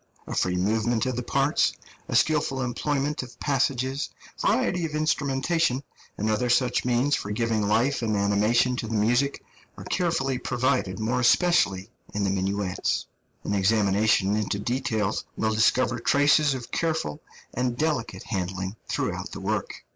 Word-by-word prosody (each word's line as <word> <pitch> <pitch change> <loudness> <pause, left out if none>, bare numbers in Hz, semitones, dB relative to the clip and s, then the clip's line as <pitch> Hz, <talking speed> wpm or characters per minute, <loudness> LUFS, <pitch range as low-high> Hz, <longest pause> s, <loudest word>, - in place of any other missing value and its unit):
A - - -6
free 90 -1 +1
movement 110 +5 +1
of 130 -1 -1
the 125 - -2
parts, 140 +4 +1 0.3
a - - -3
skilful 145 -4 +2
employment 145 +4 -1
of 125 -2 -11
passages, 135 -1 0 0.3
variety 180 -1 +1
of 155 -2 -3
instrumentation, 150 -1 0 0.3
and 105 - -1
other 110 +3 +1
such 125 +1 +2
means 125 +4 +1
for 100 - -5
giving 110 +1 0
life 120 +7 +2
and 110 -3 0
animation 105 +5 +2
to 115 - -3
the 110 - -3
music, 120 +6 +1 0.3
are - - -8
carefully 135 -8 0
provided, 125 -7 0
more 115 +4 0
especially 120 - +3 0.2
in 105 - 0
the 100 - +1
minuets. 95 0 -1 0.4
An - - -2
examination 100 0 +2
into 105 -1 -1
details 110 -2 -1
will 110 0 +1
discover 120 +2 +2
traces 145 +3 +3
of 120 -2 -8
careful 160 - -1 0.3
and 125 -1 -1
delicate 150 -5 -1
handling 95 0 -3
throughout - - -3
the - - -6
work. - - -3
120 Hz, 145 wpm, -26 LUFS, 105-135 Hz, 0.4 s, especially